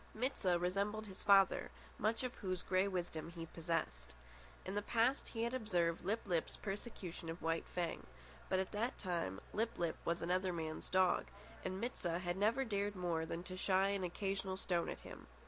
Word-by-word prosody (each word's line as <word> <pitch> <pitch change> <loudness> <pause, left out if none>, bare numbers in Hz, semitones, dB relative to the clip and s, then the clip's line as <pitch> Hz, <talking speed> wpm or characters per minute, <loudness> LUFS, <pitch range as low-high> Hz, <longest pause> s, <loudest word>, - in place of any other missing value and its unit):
Mit 255 +5 0
sah 180 -3 +3
resembled 200 +5 0
his 195 -2 -9
father, 195 -2 +6 0.3
much 225 +4 +1
of 250 -1 -2
whose 185 -3 -3
grey 185 +1 +3
wisdom 175 -4 -2
he 170 -1 -6
possessed. 155 - -2 0.5
In 190 - -3
the 205 - +1
past 235 +5 +2
he 225 -1 -2
had 235 +2 0
observed 180 -9 +1
Lip 215 +5 +1
lip's 175 -5 0
persecution 195 -5 -5
of 165 0 -5
White 165 0 0
Fang; 170 - -2 0.4
but 190 - +3
at 190 0 0
that 225 +4 -1
time 170 - -1
Lip 225 +2 0
lip 170 -2 0
was 170 0 0
another 185 +2 +2
man's 160 -2 -4
dog, 185 -1 +4 0.4
and 185 0 -2
Mit 240 +4 -2
sah 170 -1 0
had 175 -1 -1
never 225 +7 +3
dared 205 -2 0
more 170 -3 0
than 170 +1 -3
to 185 0 -6
shy 190 +1 +3
an 200 -1 0
occasional 195 +1 -1
stone 175 -3 0
at - - -5
him. - - -10
185 Hz, 190 wpm, -38 LUFS, 170-205 Hz, 0.5 s, father